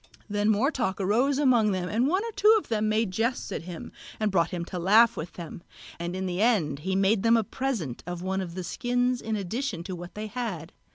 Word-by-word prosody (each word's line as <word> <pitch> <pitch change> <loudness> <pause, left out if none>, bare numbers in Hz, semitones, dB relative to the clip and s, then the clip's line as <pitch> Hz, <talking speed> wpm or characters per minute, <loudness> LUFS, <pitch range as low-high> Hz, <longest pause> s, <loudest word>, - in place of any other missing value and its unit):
Then 205 0 0
more 220 +8 +3
talk 235 -10 -2
arose 240 +9 +2
among 240 -7 +4
them, 180 -1 -2
and 230 +7 +1
one 375 +8 +1
or 460 - -4
two 430 +1 +5
of 425 - -5
them 215 -1 +1
made 215 -2 +1
jests 230 +6 -1
at - - -3
him 175 -2 -7 0.3
and 215 -1 +1
brought 170 -3 +2
him 175 -2 -4
to 180 - -5
laugh 215 +6 +5
with 160 - -6
them; 170 -1 -8 0.4
and 170 +1 -3
in 190 0 -3
the 180 +1 -2
end 175 - +2
he 190 +5 -2
made 195 +2 +3
them 230 +2 +5
a 225 - +2
present 210 - -3
of 175 0 -5
one 190 +1 -1
of 175 -2 -6
the 185 - -4
skins 245 +4 0
in 220 -1 -2
addition 205 -1 -3
to 185 +1 -5
what 175 0 -9
they 210 +1 -4
had. 210 -8 -5
210 Hz, 235 wpm, -27 LUFS, 180-240 Hz, 0.4 s, two